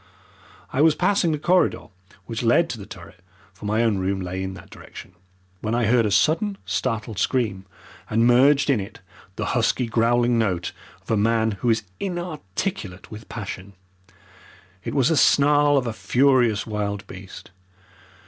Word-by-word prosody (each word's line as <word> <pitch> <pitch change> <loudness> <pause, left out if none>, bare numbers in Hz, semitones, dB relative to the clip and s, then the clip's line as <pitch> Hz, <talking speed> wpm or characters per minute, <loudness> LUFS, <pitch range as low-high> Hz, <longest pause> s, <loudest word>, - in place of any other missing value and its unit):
I 135 - +1
was 160 0 +5
passing 185 -2 +2
the 155 - 0
corridor 175 +5 +1 0.4
which 115 +2 -4
led 125 +8 +3
to 115 - -6
the 100 - -10
turret - - -12 0.3
for 95 +3 -12
my 110 +3 +1
own 110 -4 +1
room 95 +1 -1
lay 90 0 -4
in 95 0 -4
that - - -14
direction 95 - -12 0.5
when 110 +3 -2
I 120 -1 +1
heard 115 0 +3
a - - -1
sudden, 170 - +1
startled 115 -4 -2
scream, 105 -7 -1 0.4
and 115 +2 +2
merged 140 +4 +4
in 125 - +2
it 95 - -8 0.3
the - - -3
husky, 125 - +1
growling 120 +1 +2
note 90 -6 -1 0.3
of - - -7
a 110 - +2
man 110 +1 +2
who 115 +4 -2
is 110 -1 +2 0.2
inarticulate 175 - -5
with 110 +1 -10
passion. 100 -3 -7 1.1
It - - -5
was 135 +1 +3
the 160 - +2
snarl 145 +1 +4
of 130 - 0
a 115 - -3
furious 120 -3 +2
wild 105 -2 -3
beast. 95 -1 -11
115 Hz, 165 wpm, -23 LUFS, 100-140 Hz, 1.1 s, was